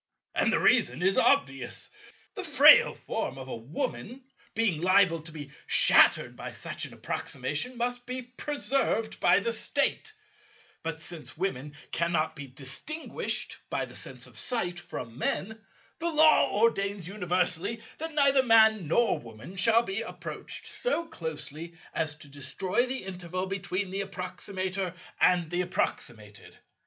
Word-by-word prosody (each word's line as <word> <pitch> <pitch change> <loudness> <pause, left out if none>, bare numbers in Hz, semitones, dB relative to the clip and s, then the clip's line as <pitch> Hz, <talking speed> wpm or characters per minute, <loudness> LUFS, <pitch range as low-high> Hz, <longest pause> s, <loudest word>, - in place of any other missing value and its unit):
And - - +2
the - - +3
reason 130 +8 +3
is 190 +1 +3
obvious. 135 - +1 0.5
The - - -3
frail - - +7
form 135 - -4
of 130 -1 -8
a - - -5
Woman, 135 - -5 0.3
being 210 -9 +1
liable 180 -2 +4
to 160 +1 -9
be 145 -3 -9 0.2
shattered - - +6
by - - -6
such - - -4
an - - -10
approximation, 145 - -3
must 245 0 -2
be 255 0 -4
preserved 250 -3 -2
by - - +5
the 465 - -1
State; 440 - 0 0.7
but 160 0 -4
since 160 -2 -3
Women 150 -6 -3 0.2
cannot 170 -2 0
be 145 -1 -8
distinguished 140 - -5
by - - -1
the - - -14
sense - - -7
of - - -11
sight 180 -8 -1
from 115 -5 -8
Men, 220 +6 -2 0.4
the 340 +1 0
Law 310 -1 +5
ordains 200 -4 +1
universally 180 +2 0 0.2
that 320 0 -4
neither 280 -2 +5
Man 220 -6 +5
nor 200 0 +2
Woman 115 - -11
shall 230 +4 +4
be 195 0 -3
approached 225 - -6
so - - -2
closely 160 - -6 0.2
as 155 -2 -1
to 150 - -15
destroy 180 - -2
the 260 +1 -4
interval 185 -1 -4
between 195 0 -3
the 195 +1 -1
approximator 185 0 -4 0.2
and 175 -3 +3
the 175 0 +1
approximated. 110 - -4
185 Hz, 145 wpm, -28 LUFS, 155-230 Hz, 0.7 s, frail